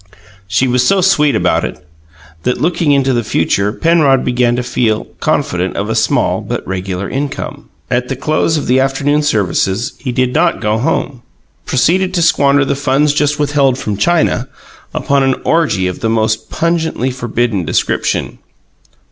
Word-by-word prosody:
She 100 +7 +1
was 125 0 +2
so 195 +10 +3
sweet 150 -6 +3
about - - +1
it 75 - -6 0.5
that, 125 - -1
looking 165 -2 +1
into 135 -2 +2
the 120 -1 0
future, 100 0 0
Penrod 150 -2 +2
began 125 -1 +1
to 125 - -2
feel 115 -3 0
confident - - -1
of - - -2
a - - -1
small - - +1
but - - -5
regular 95 +1 -3
income. 140 +1 -5 0.2
At 125 +1 0
the 135 - -3
close 155 +4 0
of 150 - -3
the 130 +2 +2
afternoon 140 +2 +1
services 105 - 0
he 130 - -3
did 125 0 0
not 170 +2 +2
go 105 +1 0
home, 125 +1 -2 0.4
but - - -13
proceeded 185 +8 +1
to 170 - +2
squander 145 -3 +3
the 140 - -1
funds 140 +1 +1
just 150 0 +1
withheld 145 -3 +1
from 105 -6 -3
China 135 - +1 0.4
upon 140 0 0
an 135 -1 +2
orgy 155 - +1
of 90 -1 -3
the 115 - -1
most 110 0 0
pungently 160 -6 -1
forbidden 120 -5 -1
description. 80 - -1
130 Hz, 165 wpm, -14 LUFS, 115-150 Hz, 0.5 s, so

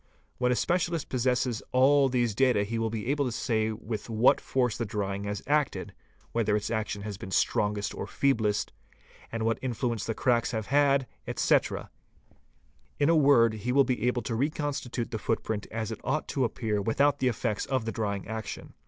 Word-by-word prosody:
When 125 0 +2
a - - +3
specialist 170 +1 0
possesses 125 -2 0
all 135 +2 +5
these 120 -3 +1
data 125 -2 +3
he 115 +3 -3
will 115 0 0
be 110 -1 -4
able 140 +3 +1
to 125 - -1
say 110 -2 0
with 110 0 -6
what 115 +2 +4
force 125 -4 0
_ - - -7
the - - +1
drying 100 -1 -3
has 105 0 -4
acted, 150 -1 0 0.4
where 110 -3 +1
its 105 +1 -2
action 110 -2 -2
has 105 -2 -6
been 95 - -7
strongest 105 +1 0
or - - -5
feeblest, 110 -7 +1 0.6
and 115 -1 -2
what 115 0 +1
influence 120 -3 -2
the 115 - -1
cracks 120 -1 +1
have 110 -2 -2
had, 140 -2 +4 0.2
etc.; - - +1 1.1
in 145 +1 +3
a 165 - +5
word 135 -7 +5
he 110 +3 -3
will 140 +2 +5
be 125 -3 -1
able 125 -1 0
to 120 - -3
reconstitute 140 -2 -2
the 110 - -3
footprint 110 -1 -2
as 110 0 -3
it 110 - -6
ought 155 - -1
to 135 -3 +1
appear 110 -2 -1
without 140 +7 +2
the 130 - +2
effects 110 -2 -1
of 130 -4 -1
the 115 - -2
drying 100 -4 -3
action. 110 0 -6
115 Hz, 190 wpm, -28 LUFS, 110-130 Hz, 1.1 s, all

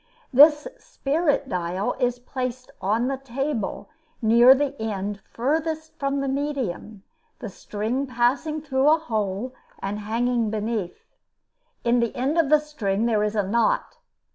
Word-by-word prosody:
This 295 - +7
"spirit 290 0 -1
dial" 180 -1 -2
is 245 -1 +1
placed 250 0 -5
on 220 +6 +1
the 270 0 -1
table, 270 -3 -3 0.3
near 235 +3 +7
the 280 0 -1
end 205 -2 -3
furthest 315 +5 -2
from 275 0 -1
the 275 - -2
medium, 265 -8 -3 0.3
the 225 - -7
string 220 +7 -3
passing 260 +6 0
through 270 -1 +2
a 315 - +6
hole 220 -4 -3 0.2
and 200 +2 -4
hanging 230 +2 0
beneath. 215 -3 -3 0.8
In 240 +1 +3
the 235 -1 -1
end 280 +7 0
of 310 -4 +2
the 305 - +7
string 230 -9 -2
there 220 -3 +2
is 210 +1 -1
a 205 - +2
knot. 220 +4 0
245 Hz, 140 wpm, -24 LUFS, 215-280 Hz, 0.8 s, This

